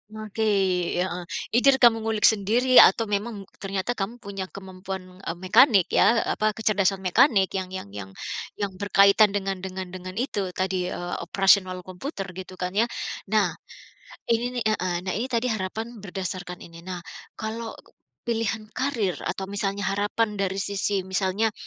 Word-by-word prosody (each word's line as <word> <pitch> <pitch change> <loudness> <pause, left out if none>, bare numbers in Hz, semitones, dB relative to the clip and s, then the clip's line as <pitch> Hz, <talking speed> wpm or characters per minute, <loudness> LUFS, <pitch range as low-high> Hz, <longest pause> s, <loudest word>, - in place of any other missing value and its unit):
Oke, 215 0 -8 0.6
heeh. 180 -1 -4 0.3
Either 265 +4 +5
kamu 230 -2 +7
ngulik 220 -1 -2
sendiri 230 +5 +5
atau 230 - +7
memang 205 0 -2 0.2
ternyata 195 +2 -2
kamu 220 -1 -3
punya 195 -2 -5
kemampuan, 190 -1 -7 0.2
eee, 180 -3 -4
mekanik 195 +2 +4
ya, 230 0 +4
apa, 215 -1 0
kecerdasan 195 -3 +1
mekanik 190 +1 +4
yang 190 -1 -3
yang 100 - -7
yang 100 -1 -8 0.4
yang 200 -2 -2
berkaitan 200 +1 +5
dengan 195 -1 -2
dengan 185 -1 -6
dengan 185 0 -8
itu 205 -4 -2
tadi, 185 -1 -1
eee, 175 -1 -4
operasional 185 0 +3
komputer 190 - -6
gitu 185 +1 -9
kan 180 0 -3
ya. 215 +5 +2 0.4
Nah, 205 -3 +2 0.8
ini 245 +2 0
nih - - 0
heeh, 185 -5 +1
nah 185 - 0
ini 225 +5 -1
tadi 235 0 0
harapan 220 +1 -4
berdasarkan 185 -2 -5
ini. 170 0 -12
Nah 180 0 -5 0.4
kalau 225 +1 -5 0.5
pilihan 225 -2 -1
karir 235 -9 -1 0.2
atau 190 - -4
misalnya 200 0 -2
harapan 205 +1 0
dari 195 0 -1
sisi 200 0 -1
misalnya 190 +3 0
200 Hz, 150 wpm, -25 LUFS, 185-220 Hz, 0.8 s, kamu